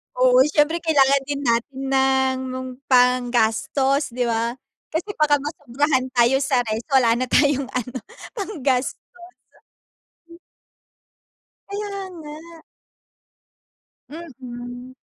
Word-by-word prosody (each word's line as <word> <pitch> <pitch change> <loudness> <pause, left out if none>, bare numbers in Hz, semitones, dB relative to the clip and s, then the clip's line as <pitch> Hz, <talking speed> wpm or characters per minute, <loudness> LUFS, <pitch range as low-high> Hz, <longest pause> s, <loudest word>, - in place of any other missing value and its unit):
Oo, 255 0 +4
siyempre 300 +2 +2
kailangan 280 -4 +3
din 285 -1 -3
natin 240 +3 -1
ng 260 -1 +1 0.2
panggastos, 250 +2 +2
di 250 +1 -1
ba? 230 0 -1 0.3
Kasi 335 +6 -3
baka 300 -1 +4
masobrahan 285 -2 -1
tayo 245 +3 +4
sa 265 -3 +1
rest 220 0 -4
wala 245 -4 +5
na 255 - -1
tayong 280 0 +2
ano, 250 +1 -3 0.3
panggastos. 285 - -1 2.7
Kaya 410 +1 -4 0.2
nga. 305 -2 -9 1.7
Mm. 250 -5 -9
265 Hz, 90 wpm, -22 LUFS, 245-290 Hz, 2.7 s, wala